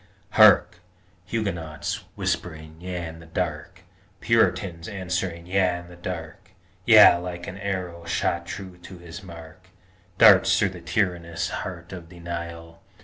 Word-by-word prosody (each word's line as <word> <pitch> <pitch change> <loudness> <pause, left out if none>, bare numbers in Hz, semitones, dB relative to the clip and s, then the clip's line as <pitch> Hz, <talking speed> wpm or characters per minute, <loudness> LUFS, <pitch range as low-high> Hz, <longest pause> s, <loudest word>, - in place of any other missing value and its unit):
_ - - -30 0.3
Hark! - - +6 0.5
Huguenots 90 -3 -4
whispering 80 -4 -4
yea 90 -1 -4
in 80 0 -9
the 80 - -14
dark, 85 +1 -4 0.4
Puritans 90 -6 +1
answering 90 -3 -3
yea 90 -1 +1
in 85 0 -11
the 90 - -12
dark! 90 +3 -7 0.3
Yea 110 -6 +8
like 85 0 -6
an 95 - -8
arrow 90 -4 -4
shot 85 - -1
true 95 -2 -8
to 90 +1 -11
his 85 +1 -10
mark, 85 -4 -12 0.5
Darts - - +7
through - - +2
the 90 -1 -10
tyrannous 85 -2 -1
heart 85 -1 -6
of 85 -2 -9
Denial. 85 -1 -8
90 Hz, 140 wpm, -24 LUFS, 85-95 Hz, 0.5 s, Yea